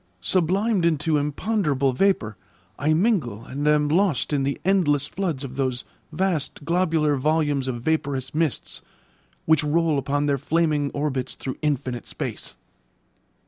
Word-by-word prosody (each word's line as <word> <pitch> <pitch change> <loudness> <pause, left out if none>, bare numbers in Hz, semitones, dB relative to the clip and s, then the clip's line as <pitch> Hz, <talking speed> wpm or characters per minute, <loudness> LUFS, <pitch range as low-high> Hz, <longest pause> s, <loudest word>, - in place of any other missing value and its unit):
Sublimed 190 - +1
into 160 -2 +2
imponderable 145 - 0
vapour, 125 - +1 0.4
I 145 +4 +1
mingle 155 - +1
and 145 +3 -3
am 150 0 +3
lost 165 -3 +1
in 140 - +2
the 140 +1 -1
endless 155 -8 +3
foods 170 -6 -3
of 135 -1 -7
those 130 -2 -1 0.3
vast 160 -4 -2
globular 160 -4 +2
volumes 145 -1 +1
of 120 -2 -4
vaporous 140 -4 -1
mists, 155 -5 -1 0.6
which 160 -1 +4
roll 155 0 +2
upon 145 +2 -1
their 140 -1 +1
flaming 150 -1 +1
orbits 135 -3 -2
through 130 - -6
infinite 130 -5 -2
space. - - -5
150 Hz, 135 wpm, -24 LUFS, 135-165 Hz, 0.6 s, which